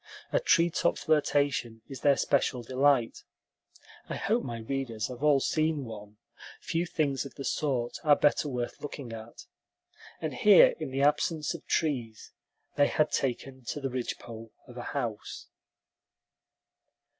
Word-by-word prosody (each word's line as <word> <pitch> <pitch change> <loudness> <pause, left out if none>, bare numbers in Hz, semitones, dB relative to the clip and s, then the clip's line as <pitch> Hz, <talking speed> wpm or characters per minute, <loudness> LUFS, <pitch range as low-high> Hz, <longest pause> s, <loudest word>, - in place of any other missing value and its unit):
A - - +3
treetop 170 - +2
flirtation 140 -7 0
is 135 -3 -8
their 140 -1 +4
special 125 -3 +1
delight 130 -1 +1 0.9
(I - - -3
hope 230 +4 0
my 120 -2 -5
readers 115 -1 -3
have 125 0 -8
all 150 -2 +4
seen 155 0 0
one; 105 -2 -10 0.4
few 170 +2 -2
things 140 -6 0
of 140 - -10
the 140 - -6
sort 130 -6 -1
are 150 -2 +6
better 150 0 +2
worth 125 -2 -4
looking 140 -5 -7
at), 115 +1 -10 0.7
and - - -3
here, - - +7
in - - -4
the 135 +1 -1
absence 150 +2 +1
of 170 - -10
trees, 125 -9 -2 0.5
they 145 -1 +5
had 155 0 +1
taken 130 0 -2
to 145 - -4
the 135 -2 -3
ridgepole 115 -2 -6 0.2
of - - -13
a - - -6 0.2
house. - - -5
135 Hz, 145 wpm, -29 LUFS, 120-150 Hz, 0.9 s, here